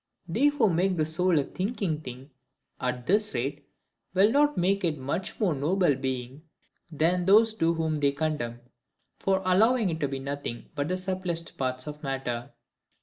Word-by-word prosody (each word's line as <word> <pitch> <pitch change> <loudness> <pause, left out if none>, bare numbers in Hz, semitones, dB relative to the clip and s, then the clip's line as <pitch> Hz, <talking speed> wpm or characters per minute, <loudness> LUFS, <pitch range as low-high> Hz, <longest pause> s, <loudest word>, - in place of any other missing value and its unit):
They 230 +12 +3
who 290 -6 +3
make 180 +1 +1
the 155 - +2
soul 170 +2 +2
a 145 - +3
thinking 185 - -2
thing, 130 +1 -9 0.5
at 125 -1 -2
this 210 - +1
rate, 140 +4 -3 0.5
will 200 +4 +5
not 295 +2 +3
make 195 +3 +1
it 165 -3 +1
a - - -13
much 140 +8 -3
more 195 -7 +2
noble 155 +3 +2
being 130 +1 -4 0.5
than 175 +4 +1
those 220 +3 +6
do 165 -5 +1
whom 160 -2 -1
they 140 -1 +3
condemn, 140 -5 -3 0.6
for 190 0 +1
allowing 215 +2 +3
it 160 - -4
to 145 - 0
be 135 0 -4
nothing 140 -3 -5
but 145 -1 -2
the 185 +2 -1
subtilist 185 -3 -3
parts 130 -1 -2
of 150 0 -7
matter. 130 -4 -3
160 Hz, 175 wpm, -27 LUFS, 140-190 Hz, 0.6 s, those